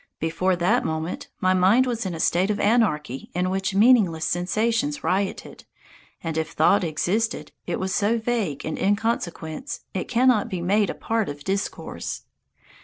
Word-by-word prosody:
Before 180 +4 0
that 175 +1 +2
moment 160 +2 -3
my 185 0 +3
mind 190 +8 +4
was 235 -5 -2
in 175 - -4
a - - -7
state 180 +4 +2
of 210 - 0
anarchy 180 - +1
in 180 +1 0
which 195 +1 -1
meaningless 200 -8 +4
sensations 230 +11 0
rioted, 190 +1 -2 0.6
and 160 -1 -2
if 160 0 -4
thought 180 +5 +4
existed, 185 +8 -1 0.2
it - - -2
was 190 0 -2
so 215 +3 +2
vague 220 - -2
and 155 - -3
inconsequent, 205 - -2
it - - -3
cannot 250 -3 +3
be 185 - -3
made 200 +4 +2
a - - -3
part 225 -4 -1
of 145 0 -7
discourse. 195 +1 -4
190 Hz, 160 wpm, -24 LUFS, 170-225 Hz, 0.6 s, mind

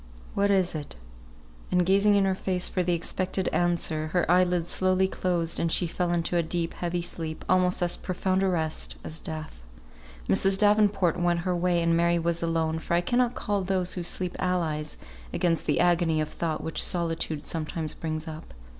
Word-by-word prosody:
What 200 0 +1
is 190 -3 +2
it?" 150 -3 -6 0.7
And 180 -1 +2
gazing 200 +3 +4
in 200 -1 +3
her 190 - +2
face 185 -1 0
for 185 - 0
the 175 -1 +1
expected 185 +2 -1
answer, 170 -3 +1
her 180 - +2
eye 180 +1 +6
lids 175 -1 -1
slowly 185 0 +3
closed, 175 -3 -1
and 165 - 0
she 180 - +2
fell 175 +1 -1
into 175 0 -1
a - - +4
deep, 165 0 -2
heavy 175 0 -2
sleep, 160 -2 -5
almost 180 -1 +2
as 175 0 +1
profound 185 +1 -1
a 195 - +2
rest 160 -4 -2
as 160 - -5
death. 155 - -7 0.6
Mrs. 195 0 +3
Davenport 205 -4 +3
went 175 -1 +1
her 180 0 -1
way, 175 -1 +1
and 165 0 +2
Mary 170 +1 +3
was 170 0 0
alone, 165 -1 0
for 170 - -1
I 175 - +3
cannot 245 +5 +1
call 205 -1 -1
those 185 -1 0
who 180 - -3
sleep 180 +1 -1
allies 160 -5 -1 0.3
against 165 -2 0
the - - +2
agony 170 -2 +3
of 155 0 -1
thought 165 -2 -3
which 160 - -1
solitude 165 -3 -1
sometimes 155 -1 -3
brings 155 -1 -4
up. 155 - -9
175 Hz, 190 wpm, -27 LUFS, 165-185 Hz, 0.7 s, eye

